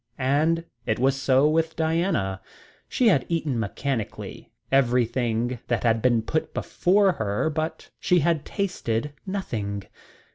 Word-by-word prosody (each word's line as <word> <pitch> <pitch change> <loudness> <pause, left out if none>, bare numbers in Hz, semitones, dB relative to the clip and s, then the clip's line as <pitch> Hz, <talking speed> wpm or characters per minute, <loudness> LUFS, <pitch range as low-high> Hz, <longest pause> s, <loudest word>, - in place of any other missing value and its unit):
And 155 +5 +1 0.2
it 110 - +1
was 130 +2 +2
so 135 +1 +3
with 160 +1 +1
Diana. 160 - 0 0.5
She 245 -3 +3
had 140 -10 +3
eaten 155 -7 -1
mechanically 115 +2 -4 0.2
everything 120 -2 +1
that 120 - 0
had 115 -1 +2
been 120 -2 +3
put 155 +7 -2
before 195 +2 +2
her, 110 - -1
but 155 +2 -4
she 180 -2 +3
had 160 -2 +2
tasted 150 - -2
nothing. 105 - -3
135 Hz, 130 wpm, -25 LUFS, 115-165 Hz, 0.5 s, so